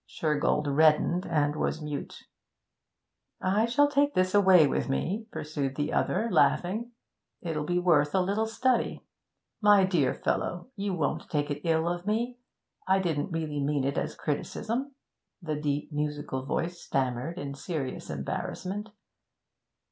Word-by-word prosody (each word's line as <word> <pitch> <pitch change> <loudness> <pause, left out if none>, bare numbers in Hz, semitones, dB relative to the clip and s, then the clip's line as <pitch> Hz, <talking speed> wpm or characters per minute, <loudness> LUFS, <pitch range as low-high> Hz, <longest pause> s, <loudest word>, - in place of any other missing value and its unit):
Shergold 150 -1 0
reddened 155 +5 +3
and 150 -3 +1
was 155 - -1
mute. 150 -2 -6 1.2
'I 205 +5 +2
shall 285 +5 +4
take 290 0 +2
this 185 0 +2
away 190 -5 +7
with 140 - -1
me,' 200 +11 -1
pursued 145 -3 -3
the 145 +1 -2
other, 230 - +1
laughing. 220 +7 +2 0.5
'It'll 155 -3 -3
be 175 - +1
worth 165 -4 +3
a - - +4
little 200 +4 0
study.' 235 +2 0 0.6
'My 205 -2 +6
dear 165 -9 +1
fellow 180 +9 -2
you 200 -2 -2
won't 155 -4 -2
take 145 -1 -1
it 145 +1 -3
ill 165 0 +2
of 175 +2 -3
me 240 +3 -1 0.5
I 190 +1 +4
didn't 165 -4 -1
really 155 -3 -2
mean 140 -1 0
it 140 +1 -1
as - - -4
a - - -25
criticism,' 230 - -3 0.4
the 160 -5 -3
deep, 145 +1 -2
musical 145 -3 -3
voice 175 +3 -2
stammered 130 +5 -2
in 140 -6 -4
serious 140 -2 -5
embarrassment. 185 - -4
165 Hz, 145 wpm, -28 LUFS, 145-200 Hz, 1.2 s, away